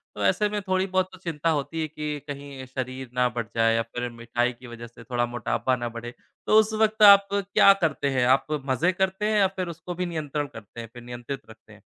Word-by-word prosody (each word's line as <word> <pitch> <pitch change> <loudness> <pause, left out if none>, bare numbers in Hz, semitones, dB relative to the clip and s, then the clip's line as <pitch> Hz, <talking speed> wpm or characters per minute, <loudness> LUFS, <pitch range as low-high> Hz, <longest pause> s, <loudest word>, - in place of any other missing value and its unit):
तो - - -4
ऐसे 210 -1 +2
में 210 0 -2
थोड़ी 185 0 0
बहुत 185 0 0
तो 185 - -12
चिंता 165 -3 -2
होती 160 +1 -1
है 155 - -1
कि 150 -1 -5
कहीं 140 -2 -7
शरीर 130 0 -5
ना 125 0 +2
बढ़ 120 -2 -2
जाए 115 0 +3
या 115 - +2
फिर 120 +2 -5
मिठाई 120 +1 -1
की 125 +1 -14
वज़ह 120 0 -9
से 115 0 -15
थोड़ा 120 +1 -1
मोटापा 120 +2 -1
ना 120 -1 -4
बढ़े। 120 +1 -8 0.3
तो 215 - +5
उस 220 0 +1
वक़्त 220 0 +3
आप 200 -1 +9
क्या 200 0 +5
करते 140 -2 -1
हैं? 130 -2 +1
आप 130 +2 +4 0.2
मजे 145 +7 +2
करते 190 +2 -1
हैं 210 - +3
या 195 - +5
फिर 185 -2 -5
उसको 175 +2 -7
भी 180 +1 -2
नियंत्रण 150 -3 -3
करते 115 -1 -12
हैं, 115 - -8
फिर 120 - -11
नियंत्रित 120 +2 -6
रखते 110 -1 -16
हैं? 105 - -17
140 Hz, 235 wpm, -25 LUFS, 120-185 Hz, 0.3 s, आप